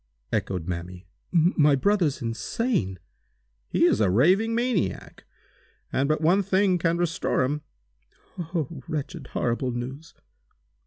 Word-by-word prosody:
echoed 90 -4 -1
Mamie. 90 +1 -5 0.3
"My 160 -4 +4
brother 195 +4 +2
insane?" 115 - -1 0.7
"He - - +1
is - - +3
a 100 - +4
raving 185 - +3
maniac! 240 -5 -2 0.7
And 140 +2 +1
but 155 0 +1
one 175 +5 +4
thing 190 -1 +2
can 165 +1 +1
restore 170 -6 0
him!" 145 +4 -1 0.7
"Oh 165 -4 -4
wretched, 150 -2 -4
horrible 120 +2 0
news! 130 +6 -6
155 Hz, 115 wpm, -26 LUFS, 120-180 Hz, 0.7 s, My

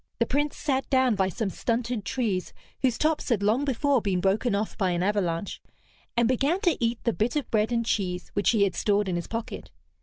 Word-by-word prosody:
The 235 - +2
Prince 290 +4 -1
sat 270 -3 -1
down 260 -3 +3
by 190 -2 +1
some 200 +1 -3
stunted 235 -2 -2
trees 205 -7 -2 0.3
whose 250 -3 +2
tops 310 -1 0
had 215 -5 +1
long 225 +7 +2
before 275 0 +2
been 195 -3 0
broken 200 +4 +1
off 210 +1 -2
by 190 -4 0
an 175 0 0
avalanche, 195 -2 -1 0.6
and 235 -1 +4
began 275 +8 +1
to 345 - +3
eat 230 0 -1
the 235 - +1
bit 230 +5 -1
of 295 - -2
bread 220 0 +2
and 230 -1 0
cheese 180 -5 -1
which 205 - +2
he 220 -4 +4
had 195 -3 +1
stored 205 +2 +1
in 180 - -1
his 175 - -3
pocket. 230 0 -5
225 Hz, 215 wpm, -26 LUFS, 200-255 Hz, 0.6 s, and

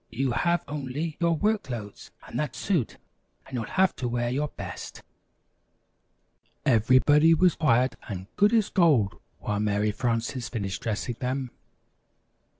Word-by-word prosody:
You 135 0 -1
have 170 +8 +1
only 145 +2 -4
your 170 -1 +2
work 210 +5 +1
clothes 110 -5 -7 0.2
and - - -5
that 150 - -2
suit 175 - -1 0.5
and - - -15
you'll 120 -3 -2
have 190 - +2
to 125 - -2
wear 120 0 -1
your 145 +4 0
best." - - -8 1.6
Everybody 130 +7 +5
was 175 +1 +4
quiet 130 -5 +2 0.2
and 95 -3 -5
good 205 +1 +4
as 225 -4 +2
gold 145 - +3 0.2
while 105 -1 -3
Mary 105 0 +1
Frances 120 +2 -2
finished 100 -5 -4
dressing 115 +2 -3
them. 130 0 -2
130 Hz, 140 wpm, -26 LUFS, 115-160 Hz, 1.6 s, Everybody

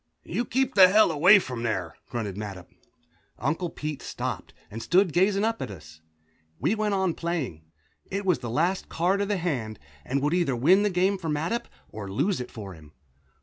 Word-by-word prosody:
"You 240 - -2
keep 265 +3 0
the 190 -2 +9
hell 210 0 +5
away 180 +7 +7
from 125 -11 -3
there," 95 -8 -2 0.2
grunted 110 -6 -4
Mattup. 100 -4 -6 0.7
Uncle 160 +7 -1
Pete 150 -2 -5
stopped - - -5 0.2
and 115 +2 -6
stood 180 - +3
gazing 195 +3 +3
up 225 +1 0
at - - -4
us. 80 -4 -12 0.6
We - - +1
went 215 -2 0
on 190 -3 +1
playing. 150 - -4 0.4
It 200 +1 -3
was 180 -8 +2
the 120 -2 -5
last 170 +10 0
card 185 +4 +1
of 200 - 0
the 205 -1 0
hand, 125 - -3 0.3
and 135 - -1
would 150 +3 +1
either 170 -7 +1
win 170 +12 +5
the 210 - +2
game 190 +1 +1
for 165 -3 -4
Mattup 160 +10 -1 0.2
or 105 -2 -8
lose 175 - 0
it 125 - -7
for 100 -4 -8
him. 75 -3 -16
165 Hz, 190 wpm, -26 LUFS, -, 0.7 s, the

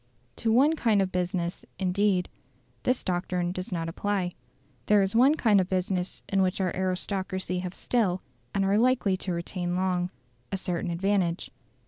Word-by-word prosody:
To 225 - +1
one 280 +7 +5
kind 225 -8 +2
of 190 -1 +1
business, 175 -1 -2
indeed, 190 0 +1 0.5
this 250 0 0
doctrine 175 -1 -1
does 185 +1 -5
not 165 -2 -2
apply. 185 +1 -1 0.6
There 205 -1 +5
is 195 +3 -1
one 265 +6 +6
kind 215 -9 +4
of 185 - -3
business 185 -1 -1
in 195 -1 +2
which 185 +1 +1
our 185 -2 0
aristocracy 185 0 -2
have 180 0 -5
still, 195 -7 0 0.3
and 195 -1 +1
are 200 +2 +3
likely 240 -5 +3
to 185 - -4
retain 175 +1 -2
long, 180 -1 0 0.4
a 195 - 0
certain 180 -2 -2
advantage. 180 0 0
185 Hz, 160 wpm, -27 LUFS, 180-205 Hz, 0.6 s, one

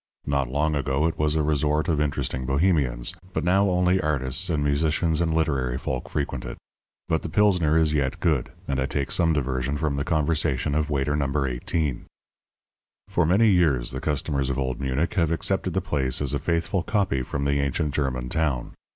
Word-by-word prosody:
Not 70 -3 0
long 75 +4 0
ago 70 +1 0
it 80 - -1
was 75 0 +1
a 80 - +2
resort 75 +1 +1
of 80 -4 +1
interesting 65 -3 -2
Bohemians, 70 -2 +1 0.2
but - - -1
now 95 +3 +3
only 90 +1 +2
artists 70 +3 -1
and 75 -4 0
musicians 75 +2 +1
and 80 -1 +1
literary 70 -6 0
folk 65 -1 -4
frequent 70 -2 -3
it. - - -7 0.5
But 80 - +1
the - - -5
Pilsner 90 -5 +3
is 80 -2 +2
yet 70 -3 0
good, 75 -7 0 0.2
and 70 -1 -1
I 65 - 0
take 70 -1 -2
some 85 -1 +3
diversion 65 -1 -1
from 75 -2 -1
the 70 - 0
conversation 75 -3 0
of 75 0 0
Waiter 75 0 0
No. 70 -1 0
18. 65 +2 -2 1.0
For 90 -4 +1
many 105 +6 +4
years 80 -10 +2
the 65 - -5
customers 70 -2 -1
of 65 - -1
Old 65 0 -2
Munich 70 +8 -1
have 85 -6 +2
accepted 90 +2 0
the 95 - +2
place 70 -7 -1
as 70 -3 -1
a - - 0
faithful 85 +2 0
copy 95 - 0
from 70 +2 -3
the 70 0 +1
ancient 70 +2 -1
German 65 -4 -1
town. 70 -3 -1
75 Hz, 190 wpm, -25 LUFS, 70-80 Hz, 1.0 s, many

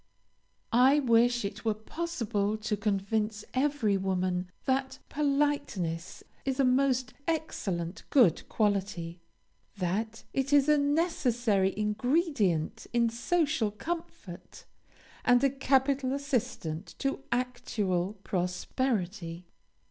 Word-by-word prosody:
I 260 +4 +6
wish 240 -3 +3
it 200 - -5
were 220 -2 +1
possible 220 -5 -2
to 215 0 -2
convince 210 +1 -1
every 260 -7 +1
woman 185 -1 -1 0.2
that 265 0 0
politeness 275 - -1 0.2
is 270 0 -2
a - - +5
most 255 0 +2
excellent 195 - -2
good 230 - +4
quality; 195 -5 -1 0.6
that 210 +5 -2
it 270 +1 -1
is 285 -1 +5
a 300 -1 +5
necessary 250 - +1
ingredient 210 - 0
in 235 -1 +3
social 295 - +1
comfort, 325 - -7 0.6
and 245 0 +4
a 275 - +4
capital 270 0 +2
assistant 245 - -3
to 275 0 -2
actual 210 -7 -1
prosperity. 180 -2 -2
235 Hz, 100 wpm, -29 LUFS, 195-275 Hz, 0.6 s, I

